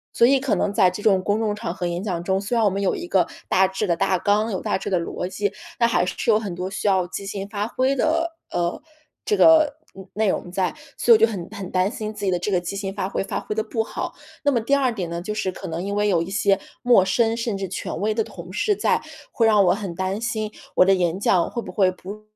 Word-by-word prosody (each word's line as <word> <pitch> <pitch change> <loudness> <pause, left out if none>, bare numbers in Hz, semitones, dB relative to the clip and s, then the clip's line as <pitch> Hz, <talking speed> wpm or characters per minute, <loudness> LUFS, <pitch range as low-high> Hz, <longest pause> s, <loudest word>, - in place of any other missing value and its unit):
所 235 - +6
以 270 +1 +4
可 265 -2 0
能 205 - 0
在 185 -2 +4
这 185 - -7
种 190 -3 +3
公 205 +2 +1
众 215 -2 0
场 190 -5 -4
合 180 -1 -3
演 175 +2 -3
讲 175 -5 -3
中， 190 +2 +1
虽 205 +4 -2
然 230 - +3
我 - - +5
们 195 +1 -3
有 195 - +1
一 - - -6
个 180 -1 +2 0.2
大 190 +1 +4
致 190 +3 -3
的 170 - +2
大 195 +1 +2
纲、 210 +4 +1
有 190 - -2
大 - - 0
致 190 - -8
的 185 -3 +2
逻 175 +1 -4
辑， 200 +2 -2 0.3
那 235 - +5
还 235 - +2
是 - - -4
有 215 - +6
很 205 -5 -5
多 180 +1 -4
需 195 - -3
要 190 -3 +2
即 195 +2 -6
兴 195 0 -5
发 205 0 -2
挥 260 +3 +1
的， 330 +4 0
呃， 175 0 -1 0.5
这 425 - +2
个， 315 -4 +6 0.2
嗯， 190 0 -11
内 215 -1 +1
容 175 - -2
在， 185 -2 -1 0.2
所 240 - +3
以 225 - +10
我 - - -9
就 225 - +7
很 180 -5 -5
很 190 -2 -7
担 185 +1 +2
心 215 -2 -5
自 205 -1 -5
己 - - +2
的 180 - +1
这 190 +4 -2
个 180 -2 +2
即 175 +3 -5
兴 195 -1 -4
发 195 -1 -3
挥 - - -2
发 - - -3
挥 210 - -5
得 220 - 0
不 225 0 -2
好。 - - -5 0.3
那 285 - +3
么 240 -4 +1
第 235 +6 -1
2 265 -3 +1
点 185 -6 -4
呢， 170 0 -3
就 210 +4 -4
是 210 -3 -2
可 - - -8
能 165 +2 -4
因 200 +1 -3
为 205 0 +2
有 175 -4 +2
一 170 - -4
些 195 0 +2 0.2
陌 240 -6 +6
生， 225 +4 +1
甚 230 -3 -2
至 195 0 -3
权 185 - -5
威 215 +2 0
的 225 +1 0
同 175 -2 -10
事 415 - +1
在， - - +1 0.3
会 230 - +2
让 210 -3 +5
我 175 - +4
很 195 -4 -5
担 190 +3 -2
心 220 -2 -2 0.2
我 - - +6
的 195 - +5
演 180 -1 0
讲 180 -3 +2
会 240 - -4
不 - - -8
会 190 -3 +3
不 200 +3 -9
200 Hz, 300 characters per minute, -23 LUFS, 185-220 Hz, 0.5 s, 以